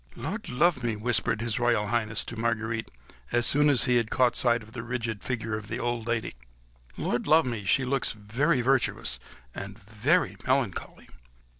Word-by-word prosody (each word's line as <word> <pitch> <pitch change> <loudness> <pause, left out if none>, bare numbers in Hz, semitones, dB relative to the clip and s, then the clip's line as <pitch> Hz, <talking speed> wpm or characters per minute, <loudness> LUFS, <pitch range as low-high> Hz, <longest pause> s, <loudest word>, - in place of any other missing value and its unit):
"Lud 160 - -5
love 140 +3 +2
me!" 115 -2 -1
whispered 110 0 +1
His 115 -2 -2
Royal 120 -3 +2
Highness 110 -2 0
to 115 - -7
Marguerite, 115 -1 -2 0.4
as 120 0 +2
soon 145 +1 +4
as 135 -5 +5
he 125 -2 +3
had 115 -2 0
caught 125 -2 +2
sight 120 -2 +2
of 110 - -15
the 115 - -6
rigid 115 -3 -4
figure 115 -3 -2
of 105 -1 -7
the - - -4
old 120 -1 -2
lady; 120 -1 -1 0.6
"Lud 120 - -2
love 160 +1 +5
me! 115 -5 -4
she 130 +6 +2
looks 135 0 +2
very 120 +7 0
virtuous 120 - +1 0.3
and 100 0 -7
very 110 - 0
melancholy." 130 -7 -1
120 Hz, 175 wpm, -27 LUFS, 110-125 Hz, 0.6 s, as